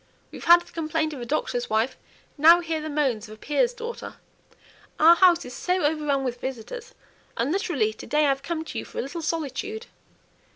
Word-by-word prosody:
We've - - -9
had 345 +1 +8
the 345 - -16
complaint 315 -1 -2
of 270 - -7
a 240 - -6
doctor's 245 -3 -2
wife, 220 +4 +1 0.4
now 330 +4 +7
hear 325 -2 -3
the 310 - -5
moans 260 -8 -1
of 215 - -9
a - - -22
peer's 300 - +1
daughter. 475 -1 -7 0.8
Our 330 +2 +8
house 350 -2 +4
is 250 - -8
so 360 +7 -1
overrun 295 -2 +1
with 250 -1 -4
visitors! 270 - -7 0.4
and 240 +5 0
literally 330 - 0
to - - -11
day 300 0 +2
I - - +3
have 270 0 0
come 320 +2 -4
to - - -5
you - - -5
for - - -12
a - - -1
little 330 +5 -6
solitude." 330 - -3
305 Hz, 205 wpm, -25 LUFS, 265-345 Hz, 0.8 s, had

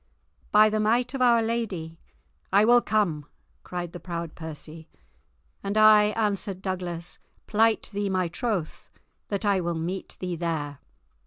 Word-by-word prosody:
"By 215 0 +6
the 215 - 0
might 235 +4 +1
of 270 - -3
Our 235 -2 +5
Lady, 195 -8 -3 0.5
I 200 +2 +5
will 240 +1 +6
come," 175 -11 0 0.3
cried 175 -1 -6
the 175 - -7
proud 170 -3 -5
Percy. 160 0 -9 0.7
"And 200 +2 -2
I," 215 -1 +7
answered 200 -3 -1
Douglas, 180 -3 -4 0.3
"plight 225 +1 +2
thee 205 0 -1
my 185 -2 0
troth 185 -3 -3 0.4
that 200 +1 -2
I 200 -2 +2
will 170 -1 -2
meet 175 +4 -4
thee 180 -1 -3
there." 155 -4 -3
190 Hz, 145 wpm, -26 LUFS, 170-215 Hz, 0.7 s, I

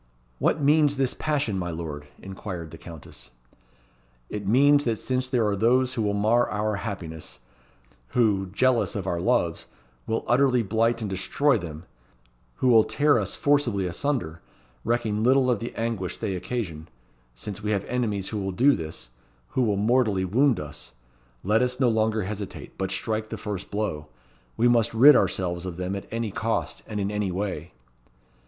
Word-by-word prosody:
"What - - +2
means 145 0 +3
this 135 -2 +1
passion, 140 -10 -1
my 90 -1 -3
Lord?" 80 -3 -6 0.2
inquired 95 -4 -7
the - - -11
Countess. 80 -5 -10 1.0
"It 105 -2 -4
means 145 +6 +5
that 115 -2 +1
since 130 +3 -2
there 125 -4 +2
are 105 -1 +1
those 125 +5 +2
who 115 - -2
will 105 -1 0
mar 110 +4 +2
our 105 0 -1
happiness; 90 -7 -6 0.7
who, 100 - +1
jealous 120 +6 +1
of 100 -3 -3
our 85 -2 -1
loves, 90 - 0 0.4
will 115 - -1
utterly 125 -1 +3
blight 115 +3 +1
and 110 - -2
destroy 140 +9 +1
them; 80 -2 -5 0.7
who 130 - +1
will 115 -2 +7
tear 145 -1 +3
us 100 -1 -3
forcibly 130 -9 +1
asunder, 90 - -2 0.4
recking 110 -2 0
little 130 +2 +4
of 120 - 0
the 115 - -5
anguish 110 -6 -3
they 95 - -2
occasion: 90 -6 -4 0.5
since 105 - -6
we 105 - -3
have 100 -2 0
enemies 110 -6 -1
who 105 - -3
will 95 -1 -2
do 135 +9 +4
this; 80 -7 -7 0.4
who 130 - 0
will 105 -5 +1
mortally 105 -3 +2
wound 125 +6 +3
us 75 -5 -8 0.5
let 105 +4 +3
us 125 0 0
no 130 -3 +4
longer 110 -1 +1
hesitate, 100 +1 -6
but 95 -1 -2
strike 110 +3 -2
the - - -5
first 100 -3 -5
blow. 100 -8 -3 0.5
We 120 - +4
must 115 -2 +2
rid 140 +6 +9
ourselves 85 -2 0
of 90 -2 -5
them 90 +2 -3
at 100 - -6
any 115 -2 -3
cost, 110 +3 -2
and 105 -1 -4
in 100 0 -1
any 105 -2 -1
way." 90 -4 -4
105 Hz, 170 wpm, -25 LUFS, 95-120 Hz, 1.0 s, rid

